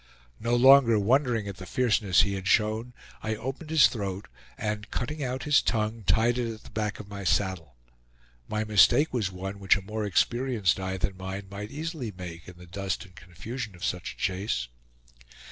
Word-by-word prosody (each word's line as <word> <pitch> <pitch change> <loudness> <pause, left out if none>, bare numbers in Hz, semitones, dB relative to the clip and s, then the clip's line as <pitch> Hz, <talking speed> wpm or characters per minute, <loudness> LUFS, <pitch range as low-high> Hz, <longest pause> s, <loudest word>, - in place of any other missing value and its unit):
No 120 +2 +1
longer 130 -2 +7
wondering 115 0 +2
at 100 -2 -6
the 95 - -9
fierceness 110 -7 +3
he 100 - 0
had 95 -1 -4
shown, 110 +4 +2 0.3
I 110 0 -2
opened 135 +7 -6
his 155 -6 +7
throat 100 -4 -5 0.3
and 105 -1 -3
cutting 150 +5 -3
out 130 0 -3
his 145 +1 +4
tongue, 110 -1 -1
tied 115 +6 +3
it 115 -2 -1
at 110 0 -10
the - - -14
back 105 0 -2
of 105 - -9
my 100 -1 -7
saddle. 90 -7 0 0.7
My 110 0 -1
mistake 110 - +4
was 110 -6 0
one 95 +2 -6
which 95 0 +4
a - - -6
more 110 +2 -4
experienced 115 0 +1
eye 95 0 -3
than 95 +1 -2
mine 95 +1 -5
might 100 +1 -6
easily 150 -4 -5
make 85 -2 -8
in 90 -1 -11
the 90 - -12
dust 95 +3 -4
and 90 -1 -19
confusion 105 +5 -7
of 85 - -5
such 90 - -3
a - - -25
chase. 95 - -2
105 Hz, 190 wpm, -27 LUFS, 95-120 Hz, 0.7 s, longer